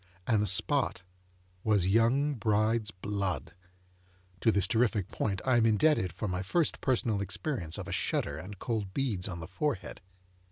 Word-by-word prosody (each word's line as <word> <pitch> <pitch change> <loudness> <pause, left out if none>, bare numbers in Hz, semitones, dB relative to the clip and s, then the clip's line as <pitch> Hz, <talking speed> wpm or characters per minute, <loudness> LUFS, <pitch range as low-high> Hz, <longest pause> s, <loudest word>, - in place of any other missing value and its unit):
And 110 -3 +2
the 105 - 0
spot 110 +3 +2 0.6
was 105 -5 +3
young 115 +9 +3
bride's 110 -1 +1
blood. 100 -2 -3 0.9
(To 115 - +3
this 100 -2 +2
terrific 110 -4 +1
point 95 -3 -2
I 130 -2 +4
am 115 -1 +4
indebted 110 - +3
for 90 +6 -4
my 90 -1 -2
first 160 - 0
personal 115 -5 +1
experience 100 - -3
of - - -6
a - - -5
shudder 70 - -1
and 100 +4 -9
cold 105 -3 -3
beads 110 -10 -1
on 90 -4 -6
the 80 - -7
forehead.) 100 +4 -3
105 Hz, 160 wpm, -30 LUFS, 95-120 Hz, 0.9 s, I